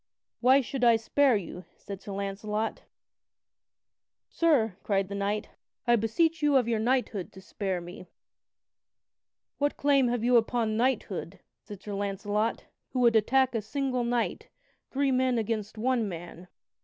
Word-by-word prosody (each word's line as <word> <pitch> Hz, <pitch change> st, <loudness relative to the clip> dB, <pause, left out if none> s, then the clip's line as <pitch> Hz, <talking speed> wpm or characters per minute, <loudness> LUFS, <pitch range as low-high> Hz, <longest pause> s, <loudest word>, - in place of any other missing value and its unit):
"Why 260 Hz, +3 st, +5 dB
should 260 Hz, 0 st, -4 dB
I 235 Hz, -1 st, +6 dB
spare 255 Hz, +3 st, +3 dB
you?" 180 Hz, -1 st, -7 dB
said 200 Hz, -1 st, -8 dB
Sir 200 Hz, -, -8 dB
Launcelot. 205 Hz, +2 st, -3 dB, 1.5 s
"Sir," 265 Hz, -, +2 dB
cried 195 Hz, -2 st, 0 dB
the -, -, -5 dB
knight, 200 Hz, +2 st, -2 dB, 0.4 s
"I 240 Hz, -1 st, +5 dB
beseech 315 Hz, +10 st, +1 dB
you 295 Hz, -1 st, +3 dB
of 250 Hz, -3 st, +4 dB
your 230 Hz, -2 st, +1 dB
knighthood 235 Hz, -5 st, 0 dB
to 190 Hz, -, -11 dB
spare 190 Hz, -1 st, -3 dB
me." 175 Hz, +1 st, -10 dB, 1.5 s
"What 290 Hz, 0 st, 0 dB
claim 275 Hz, -3 st, +3 dB
have 240 Hz, -1 st, -1 dB
you 245 Hz, 0 st, +5 dB
upon 225 Hz, -1 st, +1 dB
knighthood," 215 Hz, -6 st, -1 dB, 0.2 s
said 205 Hz, -2 st, -11 dB
Sir 205 Hz, -, -6 dB
Launcelot, 205 Hz, +2 st, -2 dB, 0.3 s
"who 255 Hz, -, 0 dB
would 235 Hz, -2 st, +4 dB
attack 260 Hz, +4 st, +3 dB
a 225 Hz, -, -1 dB
single 255 Hz, +2 st, -2 dB
knight, 235 Hz, 0 st, -1 dB, 0.4 s
three 275 Hz, 0 st, +1 dB
men 255 Hz, -1 st, +2 dB
against 220 Hz, -1 st, -3 dB
one 235 Hz, -2 st, 0 dB
man?" 175 Hz, 0 st, -9 dB
225 Hz, 145 wpm, -28 LUFS, 200-255 Hz, 1.5 s, I